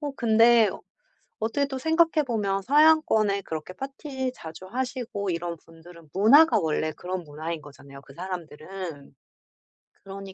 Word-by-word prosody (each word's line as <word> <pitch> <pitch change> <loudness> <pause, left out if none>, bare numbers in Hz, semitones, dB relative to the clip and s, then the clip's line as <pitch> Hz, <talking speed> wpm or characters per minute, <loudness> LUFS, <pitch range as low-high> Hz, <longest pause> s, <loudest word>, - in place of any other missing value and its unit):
어 295 -1 -3
근데 230 -1 +5 0.7
어떻게 230 +6 0
또 270 -1 -5
생각해 320 +2 +2
보면 200 -4 -1
서양권에 275 -8 +4
그렇게 160 +1 -6
파티 270 +1 -5
자주 160 +3 -10
하시고 240 -4 -4
이런 170 0 -3
분들은 165 0 -17
문화가 230 - +6
원래 155 -2 -1
그런 180 +3 -5
문화인 155 +1 -6
거잖아요 140 -1 -14
그 140 - -16
사람들은. 170 -3 -8 0.9
그러니 195 0 -9
195 Hz, 310 characters per minute, -26 LUFS, 165-255 Hz, 0.9 s, 문화가